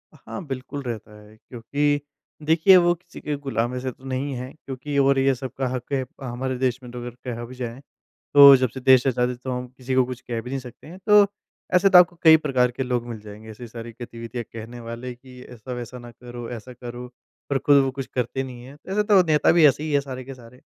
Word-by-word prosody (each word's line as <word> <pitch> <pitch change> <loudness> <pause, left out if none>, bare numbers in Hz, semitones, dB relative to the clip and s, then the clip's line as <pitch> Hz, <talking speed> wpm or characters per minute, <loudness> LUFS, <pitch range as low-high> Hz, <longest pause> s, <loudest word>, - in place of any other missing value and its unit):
हाँ, 195 - -8
बिल्कुल 135 +1 -5
रहता 110 -3 -7
है, 105 +1 -17
क्योंकि 145 +6 -1 0.5
देखिए 165 +5 +6
वो 175 -1 +4
किसी 175 0 -13
के 150 - -2
गुलाम 120 -3 -1
वैसे 125 +1 -3
तो 130 - -21
नहीं 135 +2 -3
है, 125 +1 -6
क्योंकि 140 +2 -5
और 135 -1 +4
ये 135 0 +3
सब 130 0 -6
का 135 -1 0
हक 125 0 -5
है, 130 -1 0 0.2
हमारे 130 +1 -3
देश 125 -1 0
में 125 - -10
तो 125 - -7
अगर 120 0 -7
कहा 120 -1 -4
भी 125 +2 -11
जाए, 120 -1 -6 0.5
तो 140 -1 +10
जब 130 -1 0
से 130 - -8
देश 130 -1 +5
आज़ाद 125 -1 +1
हैं 125 - -5
तो 130 - -3
हम 125 0 -4
किसी 130 0 -3
को 130 - +5
कुछ 125 -1 -7
कह 120 -3 -4
भी 125 - -9
नहीं 135 +1 -2
सकते 125 +1 -13
हैं। 175 +4 -10
तो, 210 -1 +7 0.5
ऐसे 190 +2 +5
तो 190 - +8
आपको 180 0 +6
कई 160 -1 +9
प्रकार 130 -5 +1
के 130 +2 -3
लोग 125 -2 -1
मिल 115 -2 -6
जाएँगे, 105 +1 -11
ऐसी 120 +3 -10
सारी 115 0 -8
गतिविधियाँ 120 0 -6
कहने 115 +2 -8
वाले 120 +2 -7
कि 125 0 -15
ऐसा-वैसा 125 +1 -7
ना 120 0 -11
करो, 120 0 -9
ऐसा 125 +1 -8
करो, 120 0 -8 0.4
पर 140 - +2
खुद 145 +1 +4
वो 135 - -1
कुछ 135 0 -5
करते 125 +1 -1
नहीं 125 -2 -9
है। 135 +3 -12
तो 150 - -12
ऐसे 210 +2 +2
तो 205 -3 +5
नेता 150 -1 +4
भी 170 -2 +6
ऐसे 145 +2 +1
ही 155 - -3
है 145 - +4
सारे 130 -2 -7
के 135 +2 -9
सारे। 125 0 -16
130 Hz, 245 wpm, -23 LUFS, 120-140 Hz, 0.5 s, तो